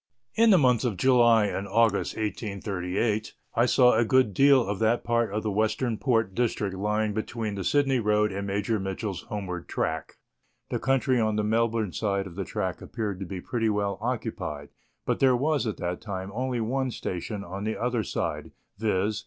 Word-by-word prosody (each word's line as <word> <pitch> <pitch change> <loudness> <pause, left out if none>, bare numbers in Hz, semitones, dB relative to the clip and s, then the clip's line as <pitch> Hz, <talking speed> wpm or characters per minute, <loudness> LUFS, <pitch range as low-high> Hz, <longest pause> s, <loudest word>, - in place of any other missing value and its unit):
In 230 +1 +4
the 195 - +7
months 125 -6 +3
of 115 -7 -1
July 120 -1 +5
and 100 0 -3
August 115 -3 +2
J838 105 0 -2 0.2
I 120 +2 +3
saw 125 0 +5
a 115 - +4
good 130 -2 +3
deal 135 +1 +5
of 100 -1 -2
that 115 +2 +2
part 115 -2 +1
of 105 +1 -2
the 110 - -1
Western 110 +3 0
Port 115 -6 +1
district 105 -3 -1
lying 105 +2 0
between 110 0 -3
the 100 -1 -4
Sydney 135 +2 +2
road 105 -1 +2
and 100 +1 -4
Major 100 +2 0
Mitchell's 95 -1 -4
homeward 90 -4 -5
track; - - -3 0.6
the - - -1
country 135 -1 +2
on 110 -1 +1
the 105 - 0
Melbourne 110 -2 0
side 100 -2 -1
of 95 - -9
the 95 +2 -4
track - - -3
appeared 105 -5 -4
to 95 - -5
be 95 -1 -6
pretty 115 +1 -1
well 100 -2 -1
occupied, 90 - -4 0.4
but - - 0
there 130 -2 +5
was 145 -1 +1
at 110 - -3
that 90 0 -3
time 95 -2 -5
only 125 +1 -2
one 130 +4 -1
station 100 -1 -4
on 95 +2 -6
the 110 +1 -2
other 120 -1 0
side, 105 - -3 0.3
viz. 105 -1 0
110 Hz, 185 wpm, -27 LUFS, 100-120 Hz, 0.6 s, the